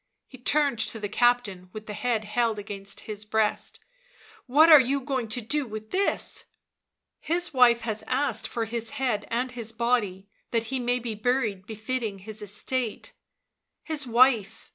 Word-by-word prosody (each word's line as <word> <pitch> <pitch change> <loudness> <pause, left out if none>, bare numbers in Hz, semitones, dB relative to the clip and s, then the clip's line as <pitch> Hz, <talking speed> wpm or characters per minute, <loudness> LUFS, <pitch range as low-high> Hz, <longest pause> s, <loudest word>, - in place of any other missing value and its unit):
He 260 - -13
turned 285 -1 +2
to 225 0 -1
the 210 - -3
captain, 210 -5 +1
with 215 0 -8
the 210 - -6
head 225 +1 -1
held 225 +1 0
against 200 -1 -7
his 210 -1 -7
breast. 215 0 -1 0.7
"What 295 +6 +6
are 310 -3 +10
you 270 +2 +1
going 260 -3 -2
to 220 +3 -3
do 285 +4 -1
with 215 0 -8
this?" 390 +2 0 0.4
" - - -59
His 350 -1 +1
wife 240 -2 +5
has 220 -2 -3
asked 255 -4 0
for 230 -1 -2
his 230 0 -3
head 250 -6 -1
and 245 +2 -1
his 230 -3 -4
body 225 -5 0 0.2
that 230 -1 0
he 260 - 0
may 245 0 +1
be 235 -2 -4
buried 215 -3 -1
befitting 220 -1 -3
his 215 +2 -7
estate." 215 +3 -3 0.7
"His 300 -4 -3
wife!" 235 -3 +3
235 Hz, 165 wpm, -26 LUFS, 215-255 Hz, 0.7 s, are